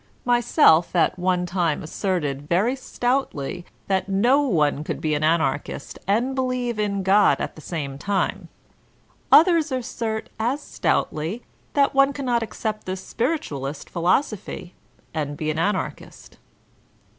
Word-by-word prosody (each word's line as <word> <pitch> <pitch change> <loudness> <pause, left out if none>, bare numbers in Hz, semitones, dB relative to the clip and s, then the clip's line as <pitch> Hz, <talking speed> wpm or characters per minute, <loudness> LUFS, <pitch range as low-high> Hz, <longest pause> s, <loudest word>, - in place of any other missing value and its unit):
^ - - -34 0.2
Myself 240 - +4
at 175 +1 +2
one 180 0 +1
time 175 -4 -1
asserted 150 -5 -2
very 205 +9 +2
stoutly 245 - -2 0.2
that 190 0 0
no 240 +9 +4
one 150 - +1
could - - -4
be 155 -1 -1
an 150 0 0
Anarchist 155 -3 -1
and 235 +7 +1
believe 255 -3 -1
in 200 -2 -1
God 200 +2 +4
at - - -3
the 155 - -11
same 140 -5 -5
time. 195 +1 -1 0.8
Others 325 -1 +6
assert 230 -3 -3
as 245 +6 0
stoutly 180 - -1 0.3
that 280 -1 +3
one 275 +1 +4
cannot 250 -4 0
accept 215 -2 -4
the 185 - -2
spiritualist 185 - -3
philosophy 180 +1 -1 0.4
and 145 -2 -3
be 155 0 -1
an 155 - -3
Anarchist. 205 +5 -3
195 Hz, 135 wpm, -23 LUFS, 160-245 Hz, 0.8 s, Others